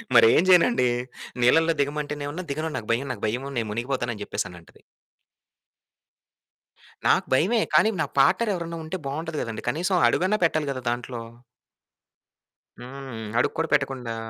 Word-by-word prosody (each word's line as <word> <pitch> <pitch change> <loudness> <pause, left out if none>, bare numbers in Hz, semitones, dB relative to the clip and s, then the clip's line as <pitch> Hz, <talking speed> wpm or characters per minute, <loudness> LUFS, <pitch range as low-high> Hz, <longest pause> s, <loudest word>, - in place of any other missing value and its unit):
మరి 115 -1 +8
ఏం 170 - +4
చేయనండి? 180 - +5 0.6
నీళ్ళల్లో 165 +6 +4
దిగమంటేనేమన్న, 145 +3 -3
"దిగను. 155 +2 -3
నాకు 105 - -7
భయం, 135 +4 -2
నాకు 105 - -12
భయం 125 +5 -2
నేను 115 -2 -1
మునిగిపోతాను" 120 +1 -2
అని 105 - -11
చెప్పేసనంటది. 90 -4 -6 2.3
నాకు - - +3
భయమే. 210 - +3
కానీ 220 - +5
నా - - +1
పార్ట్‌నర్ 210 +11 +4
ఎవరైనా 170 -1 -5
ఉంటే 160 +4 -4
బావుంటది 155 +2 -4
కదండీ! 115 -1 -5
కనీసం 180 +4 0
అడుగన్నా 190 +4 +2
పెట్టాలి 155 -3 0
గదా 130 -1 -5
దాంట్లో. 120 0 -4 1.6
హ్మ్. 130 -1 -8 0.2
అడుగు - - +1
కూడా 165 - 0
పెట్టకుండా 125 -4 0
140 Hz, 135 wpm, -25 LUFS, 120-165 Hz, 2.3 s, మరి